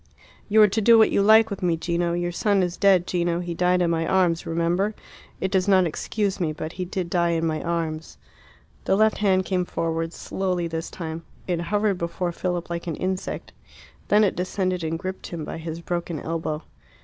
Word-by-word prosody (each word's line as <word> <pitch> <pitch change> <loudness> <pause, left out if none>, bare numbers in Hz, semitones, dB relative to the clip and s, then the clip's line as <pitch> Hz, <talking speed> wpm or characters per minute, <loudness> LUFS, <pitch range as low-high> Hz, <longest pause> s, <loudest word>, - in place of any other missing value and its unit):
"You 215 +1 +6
are - - +7
to 215 +3 -1
do 230 +2 +7
what 220 - +5
you - - +3
like 220 +2 +6
with 200 - -4
me, 175 -2 +1
Gino. 170 +1 -1
Your 175 0 -1
son 200 +2 +2
is 175 -1 -2
dead, 190 -3 +4
Gino. 175 -1 0
He 175 -1 -4
died 180 +1 +2
in 170 - +1
my 165 0 0
arms, 175 -3 +2
remember. 175 +5 0 0.4
It 190 - -2
does 190 0 +1
not 190 -2 +5
excuse 200 +4 -2
me; 160 -4 0
but 155 +1 -5
he 180 0 -4
did 180 0 -3
die 170 -1 +1
in 165 0 0
my 155 -1 -1
arms." 165 -2 -3 0.7
The - - +3
left 215 +1 +3
hand 190 -3 +2
came 185 -1 0
forward, 165 -1 -2
slowly 180 -1 -2
this 165 0 -4
time. 160 -1 -6 0.2
It 175 -2 -1
hovered 205 +1 0
before 175 +1 -2
Philip 175 0 -3
like 170 0 -5
an 165 - -2
insect. 185 +2 -4 0.6
Then 210 +1 +5
it 200 - +2
descended 185 -1 -1
and 160 0 -2
gripped 190 +1 -6
him 165 -3 -5
by - - -6
his 165 0 -6
broken 170 -2 -3
elbow. 160 -1 -3
175 Hz, 205 wpm, -24 LUFS, 165-190 Hz, 0.7 s, are